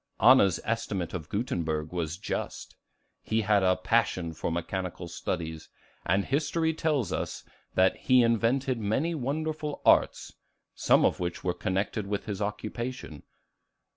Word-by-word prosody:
Anna's 105 -6 +6
estimate 100 -6 -2
of 80 -4 -5
Gutenberg 80 -8 -2
was 85 -2 -3
just. 100 - -5 0.5
He 110 +1 0
had 105 -1 +3
a 95 0 +4
passion 90 -4 0
for 80 - -3
mechanical 85 +1 -3
studies; 80 -1 -4 0.3
and 95 +2 +1
history 160 +3 0
tells 150 - 0
us - - -3 0.3
that 95 0 +4
"he 130 -1 +4
invented 115 +3 +1
many 115 +11 0
wonderful 155 +1 -3
arts," - - +3 0.4
some - - +4
of - - +1
which 90 -1 -3
were 90 - 0
connected 100 +3 -2
with 100 0 -2
his 100 -2 -4
occupation. 105 - -4
105 Hz, 135 wpm, -28 LUFS, 90-130 Hz, 0.5 s, Anna's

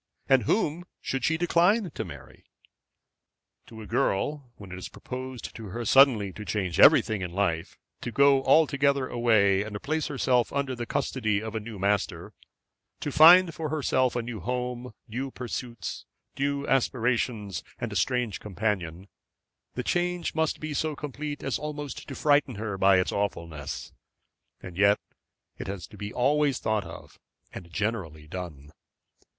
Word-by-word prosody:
and 130 -5 +4
whom 175 - +1 0.2
should 135 -2 -3
she 160 +3 +2
decline 175 +3 +3
to - - -4
marry? 75 -6 -12 1.2
To 110 -1 -10
a - - -9
girl, 130 +7 -1
when 100 -3 -12
it 90 - -6
is - - -7
proposed 130 -1 -7
to 110 -2 -8
her 115 +5 -5
suddenly 115 -6 +5
to 105 - -8
change 95 -3 -2
everything 110 -3 +6
in 90 -2 -4
life, 85 -4 -1 0.2
to 120 - -4
go 140 +1 +4
altogether 140 -2 +3
away 110 -6 +3
and 105 -1 -5
place 155 +1 -1
herself 125 -4 +1
under 140 -2 -1
the 120 -1 -5
custody 115 -7 0
of 110 0 -6
a 110 - -1
new 110 0 -8
master, 100 +1 -1 0.7
to 145 - -3
find 165 +4 +8
for 155 0 -4
herself 130 -4 +1
a 120 - -1
new 115 -2 -6
home, 125 +3 -4
new 125 +5 -4
pursuits, 120 -5 -6 0.3
new 140 +1 -1
aspirations, 120 - 0 0.2
and - - -4
a - - -6
strange 125 -5 0
companion, 95 -3 -3 0.7
the 125 - -2
change 175 +3 -1
must 160 -1 0
be 155 -1 -4
so 155 +1 -1
complete 145 +1 -6
as 135 - -1
almost 150 -2 -6
to 135 - -6
frighten 145 -4 +2
her 105 -1 -4
by 95 0 +5
its 90 - +1
awfulness. 85 -8 -4 0.7
And 90 -2 -9
yet 100 0 +5 0.6
it - - -5
has 95 -2 -5
to - - -13
be 105 0 -6
always 140 +3 +2
thought 110 -3 -1
of, - - -11 0.3
and 85 -2 -9
generally 85 -6 -3
done. 75 -5 -7
120 Hz, 155 wpm, -27 LUFS, 100-140 Hz, 1.2 s, find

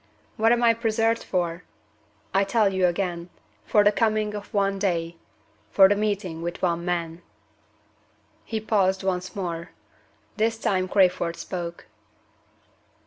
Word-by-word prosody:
What 225 0 +3
am 240 0 +2
I 230 -1 +6
preserved 225 0 0
for? 175 -1 -2 0.7
I 195 - +4
tell 200 0 +2
you 185 -1 +3
again, 175 -1 -3 0.4
for 210 - +4
the 205 - +5
coming 215 -1 0
of 205 -1 -7
one 195 -1 0
day 170 -4 -1 0.5
for 195 -1 +7
the 200 - +3
meeting 200 -5 -2
with 170 +1 -4
one 170 -1 0
man." 170 -1 -3 1.2
He 220 - -3
paused 195 -3 +1
once 185 -1 -2
more. 170 -3 -4 0.7
This 225 +1 +1
time 185 -4 0
Crayford 180 -3 +2
spoke. 170 -1 -6
190 Hz, 135 wpm, -25 LUFS, 175-215 Hz, 1.2 s, for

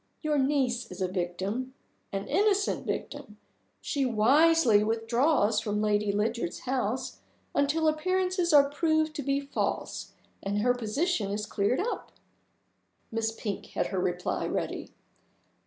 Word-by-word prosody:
Your 300 -2 +1
niece 260 -4 +1
is - - -9
a 185 - +1
victim 190 +8 -3 0.4
an 195 -1 -3
innocent 405 0 +1
victim. 270 -8 -5 0.4
She 285 -2 -1
wisely 255 0 +4
withdraws 225 +1 +2
from 210 -1 -2
Lady 210 -1 +1
Lydiard's 210 -3 -1
house 255 -2 -2 0.3
until 310 +3 +2
appearances 365 +3 +1
are 285 -2 +7
proved 315 +1 +1
to - - -2
be 275 0 0
false 280 0 -3 0.3
and 200 +1 -1
her 245 +2 +3
position 245 - -1
is 210 +1 -2
cleared 205 +4 0
up." 465 +5 -3 1.0
Miss 225 0 0
Pink 215 -3 -5
had - - -2
her 190 - 0
reply 180 0 -1
ready. - - -3
245 Hz, 130 wpm, -28 LUFS, 210-300 Hz, 1.0 s, are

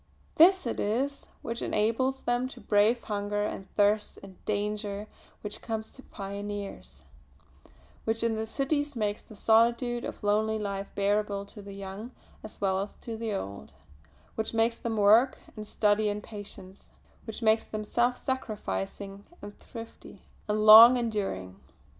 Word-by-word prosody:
This 370 +2 +6
it 235 - -2
is 265 +7 -1 0.2
which 230 +1 -4
enables 245 +5 0
them 245 +1 0
to 260 - -11
brave 215 +3 +2
hunger 205 0 -2
and 195 -2 -6
thirst 205 0 +2
and 195 -1 -11
all - - -27
danger 205 0 -2 0.4
which 210 0 -5
comes 220 -1 -4
to 265 - -14
pioneers; 200 -1 -7 1.0
which 225 +1 0
in 230 -1 +2
the 220 0 -3
cities 290 +4 -1
makes 210 -2 -1
the 215 - -15
solitude 235 +3 +3
of - - -7
lonely 215 +1 +2
life 200 -2 -3
bearable 200 0 0
to 205 +1 -10
the 200 0 -10
young 200 +3 -7 0.3
as 215 - -9
well 190 -1 +1
as 200 - -6
to 230 - -7
the 225 0 -3
old; 100 - -6 0.6
which 220 +1 -3
makes 230 +1 +2
them 225 -2 -3
work 215 +6 +5 0.2
and 215 -1 -7
study 210 0 +2
in 205 0 -2
patience; 200 -2 -11 0.3
which 220 +1 -6
makes 220 0 +3
them 215 0 -4
self 240 +3 +1
sacrificing, 200 - -4 0.2
and 205 0 -11
thrifty, 230 -1 -11 0.2
and 215 0 0
long 230 +4 +11
enduring. 205 - -3
215 Hz, 155 wpm, -28 LUFS, 205-230 Hz, 1.0 s, long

